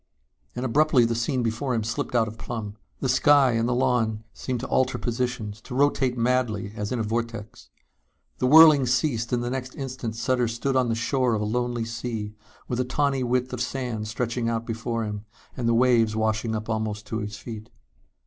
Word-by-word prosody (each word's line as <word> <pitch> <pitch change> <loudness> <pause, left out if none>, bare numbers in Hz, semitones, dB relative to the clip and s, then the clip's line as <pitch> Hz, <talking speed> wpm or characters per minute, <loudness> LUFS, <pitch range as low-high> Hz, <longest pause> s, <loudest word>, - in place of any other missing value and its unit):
And 125 +1 -3
abruptly 135 0 +4
the 115 - 0
scene 120 +2 -1
before 120 +3 -1
him 110 - 0
slipped 115 +3 -3
out 115 -2 +3
of 110 +1 -9
plumb. 105 -3 -5 0.3
The 135 - 0
sky 135 +1 +5
and 115 +1 0
the 125 - +1
lawn 120 -4 +1
seemed 125 -2 -4
to 130 - -4
alter 130 0 +1
positions, 120 -3 -3
to 125 - -8
rotate 135 -2 +2
madly 115 -4 0
as 105 -3 -4
in 125 - -1
a 115 - 0
vortex. 115 -1 -4 0.7
The 125 - +2
whirling 155 -2 +8
ceased 120 -2 0
and 120 -1 0
the 120 - -2
next 130 0 -4
instant 130 -4 -5
Sutter 125 +1 +1
stood 120 +4 -2
on 130 -2 +2
the 115 - +1
shore 120 +1 +1
of 105 - -2
a - - -1
lonely 120 +1 -1
sea 115 -2 -4 0.3
with 125 - -2
a - - +3
tawny 135 +1 0
width 125 +1 0
of 125 - -3
sand 125 -4 -3
stretching 115 +1 -2
out 115 0 -2
before 115 0 -3
him 105 -1 -5 0.3
and 120 -2 -1
the 115 - +3
waves 115 -3 +3
washing 110 +1 0
up 110 0 -4
almost 110 -1 -3
at 110 - 0
his 105 -1 -5
feet. 110 -2 -8
120 Hz, 200 wpm, -25 LUFS, 110-125 Hz, 0.7 s, whirling